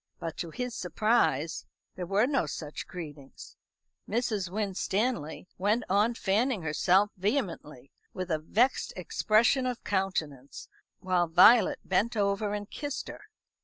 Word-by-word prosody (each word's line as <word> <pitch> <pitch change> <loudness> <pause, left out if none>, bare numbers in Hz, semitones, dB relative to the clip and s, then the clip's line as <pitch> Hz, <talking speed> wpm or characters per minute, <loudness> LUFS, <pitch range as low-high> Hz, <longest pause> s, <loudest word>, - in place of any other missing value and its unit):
But 165 -1 -5
to 170 - -4
his 250 +8 -4
surprise 170 - 0 0.3
there 180 -2 -5
were 200 +5 +3
no 270 - 0
such 155 +2 -6
greetings. 150 -6 -10 0.5
Mrs. 215 -4 -1
Winstanley 195 -2 -2
went 210 +5 +1
on 210 +5 +2
fanning 215 0 0
herself 185 +6 +2
vehemently, 180 - -3 0.2
with 185 -1 -5
a 155 - +1
vexed 230 - +1
expression 220 +8 +2
of 250 -2 -4
countenance, 160 -9 -3 0.3
while 180 -2 +1
Violet 185 +8 +6
bent 215 +5 +1
over 200 0 0
and 205 -1 -5
kissed 290 +3 -5
her. - - -9
195 Hz, 130 wpm, -29 LUFS, 165-225 Hz, 0.5 s, Violet